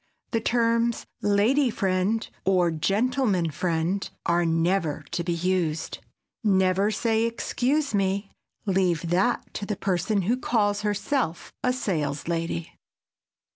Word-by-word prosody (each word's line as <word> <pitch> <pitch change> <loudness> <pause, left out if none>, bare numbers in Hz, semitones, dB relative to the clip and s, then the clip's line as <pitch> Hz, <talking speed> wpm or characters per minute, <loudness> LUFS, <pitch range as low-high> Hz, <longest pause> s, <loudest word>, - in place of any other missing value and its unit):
The 230 - +1
terms 230 0 +1 0.2
"lady 225 +7 +3
friend" 195 +2 0 0.2
or 180 -3 +3
"gentleman 200 - +1
friend" 170 +4 -1 0.2
are 170 0 +2
never 165 -2 +1
to 170 - -1
be 175 - -2
used. 170 -2 -1 0.4
Never 190 -1 +3
say 225 +1 +1
"Excuse 255 +4 0
me!" 195 0 0 0.3
Leave 180 -4 +1
that 195 +7 +1
to - - -5
the 210 - -2
person 195 +2 0
who 235 +7 +1
calls 205 -5 +1
herself 205 - -1
a 250 - +3
"saleslady." 165 - -2
195 Hz, 115 wpm, -26 LUFS, 175-225 Hz, 0.4 s, lady